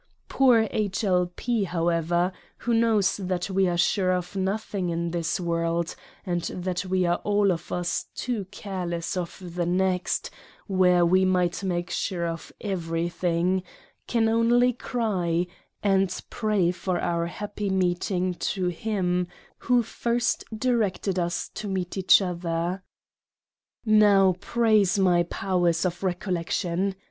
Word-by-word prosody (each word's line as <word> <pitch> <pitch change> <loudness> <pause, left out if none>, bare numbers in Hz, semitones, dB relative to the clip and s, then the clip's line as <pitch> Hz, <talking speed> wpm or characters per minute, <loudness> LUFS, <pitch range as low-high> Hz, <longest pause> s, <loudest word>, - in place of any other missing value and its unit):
Poor 245 -5 +4
H. 205 -1 -1
L. 180 -3 +2
P. 235 -4 0
however, 170 0 +1 0.3
who 240 - -1
knows 225 -4 +3
that 185 -1 -2
we 190 0 +3
are 175 -1 0
sure 185 +1 +2
of 180 +1 -2
nothing 195 -1 -2
in 170 0 -2
this 170 +2 -1
world, 170 -1 -1 0.3
and 175 -1 -1
that 180 0 -3
we 185 0 +1
are 175 0 +2
all 205 -1 +2
of 165 -2 -4
us 175 0 -2
too 235 -6 -2
careless 180 -4 -4
of 175 -2 -4
the 175 -1 -1
next 185 0 0 0.3
where 180 -3 +4
we 185 +2 +4
might 180 -1 +1
make 175 -2 -2
Sure 175 -3 -1
of 165 0 -5
every 170 -4 -2
thing; 175 +1 0 0.5
can 230 -2 +2
only 240 +2 +3
cry; 185 -9 -1 0.4
and 195 -2 +2
pray 210 -6 +1
for 180 0 -2
our 170 0 -1
happy 205 +2 -4
meeting 185 0 0
to 180 +1 -1
him 180 -1 -1 0.3
who 245 -1 +2
first 235 +1 -1
directed 210 -6 0
us 175 -1 -1
to 210 - -6
meet 185 -2 -3
each 190 +1 +5
other. 175 0 -2 1.0
Now 205 -3 +5
praise 215 -3 +2
my 180 -3 +4
Powers 175 -1 0
of 175 -1 -1
Recollec 180 -2 -2
tion. 185 +3 0
185 Hz, 135 wpm, -26 LUFS, 175-200 Hz, 1.0 s, each